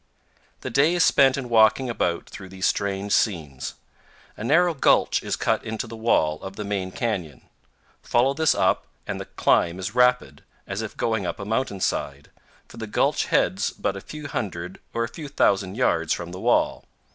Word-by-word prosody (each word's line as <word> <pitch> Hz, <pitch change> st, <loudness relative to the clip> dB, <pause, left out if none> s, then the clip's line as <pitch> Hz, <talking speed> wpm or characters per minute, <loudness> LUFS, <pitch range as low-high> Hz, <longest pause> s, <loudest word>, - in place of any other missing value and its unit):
The -, -, -5 dB
day 145 Hz, +8 st, +3 dB
is 175 Hz, -, +4 dB
spent 135 Hz, -2 st, +4 dB
in 135 Hz, -2 st, -4 dB
walking 115 Hz, +3 st, +4 dB
about 90 Hz, -8 st, -1 dB
through 95 Hz, -2 st, -10 dB
these 95 Hz, 0 st, -4 dB
strange 100 Hz, 0 st, -1 dB
scenes. 80 Hz, -13 st, -1 dB, 0.6 s
A -, -, -8 dB
narrow 165 Hz, +8 st, +3 dB
gulch 140 Hz, -, +3 dB
is -, -, -2 dB
cut -, -, 0 dB
into 110 Hz, +1 st, -4 dB
the 115 Hz, -1 st, -9 dB
wall 80 Hz, -9 st, +1 dB
of 95 Hz, 0 st, -8 dB
the 105 Hz, -, -5 dB
main 100 Hz, -2 st, -2 dB
canyon. 95 Hz, -, -3 dB, 0.6 s
Follow 130 Hz, +3 st, +2 dB
this 160 Hz, +1 st, +2 dB
up -, -, +1 dB, 0.2 s
and -, -, -4 dB
the -, -, -6 dB
climb 85 Hz, +1 st, +1 dB
is 95 Hz, +2 st, -5 dB
rapid, 125 Hz, 0 st, +2 dB, 0.2 s
as 95 Hz, +3 st, -4 dB
if 110 Hz, -, -7 dB
going 110 Hz, -5 st, -1 dB
up -, -, -4 dB
a 100 Hz, -, -5 dB
mountain 110 Hz, -2 st, -2 dB
side, 70 Hz, -4 st, -2 dB, 0.4 s
for -, -, -14 dB
the 110 Hz, -1 st, -5 dB
gulch -, -, +1 dB
heads -, -, +1 dB
but 95 Hz, -, -3 dB
a 95 Hz, -, -7 dB
few 150 Hz, +6 st, -8 dB
hundred 90 Hz, -8 st, -5 dB
or 115 Hz, -, -1 dB
a -, -, -2 dB
few 155 Hz, +2 st, -8 dB
thousand 100 Hz, -8 st, +1 dB
yards 80 Hz, -1 st, +1 dB
from 85 Hz, 0 st, -5 dB
the 90 Hz, -, -7 dB
wall. -, -, +1 dB
105 Hz, 190 wpm, -24 LUFS, 95-125 Hz, 0.6 s, is